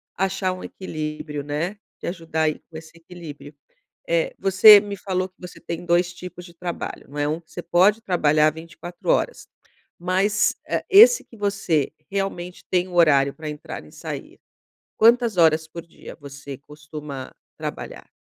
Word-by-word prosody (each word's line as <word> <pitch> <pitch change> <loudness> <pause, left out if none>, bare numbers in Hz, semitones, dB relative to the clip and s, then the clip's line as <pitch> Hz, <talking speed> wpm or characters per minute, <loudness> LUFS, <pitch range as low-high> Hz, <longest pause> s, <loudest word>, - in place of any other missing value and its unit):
achar 190 0 0
um 185 - -9
equilíbrio, 150 -4 -5
né, 155 +8 -3 0.2
te - - -8
ajudar 165 -2 -2
aí 155 -1 0
com 160 - -9
esse 160 0 -11
equilíbrio. 165 -4 -11 0.5
Eh, - - +1
você 200 +2 +9
me 200 -1 -6
falou 185 -1 -2
que 185 - -45
você 180 -1 -10
tem 170 +1 -6
2 175 +1 +2
tipos 180 0 -9
de 170 - -14
trabalho, 175 0 -6
não 145 - -9
é? 145 - +1
Um 155 +2 -1
que 165 - -26
você 175 - -6
pode 185 +6 +3
trabalhar 155 -6 +3
24 170 - -9
horas - - +1 0.5
mas, 190 +4 +2
eh, - - -1
esse 455 +4 +8
que 230 - -17
você 195 -8 0 0.2
realmente 190 -3 -4
tem 180 0 +1
horário 145 -6 +4
pra 155 -1 -7
entrar 150 -1 -7
e 75 - -16
sair, - - -8 0.6
quantas 230 -2 +4
horas 160 -1 +4
por 170 +1 -8
dia 170 - -12
você 140 0 -8
costuma 150 -2 -9 0.3
trabalhar? - - -7
175 Hz, 160 wpm, -23 LUFS, 155-190 Hz, 0.6 s, você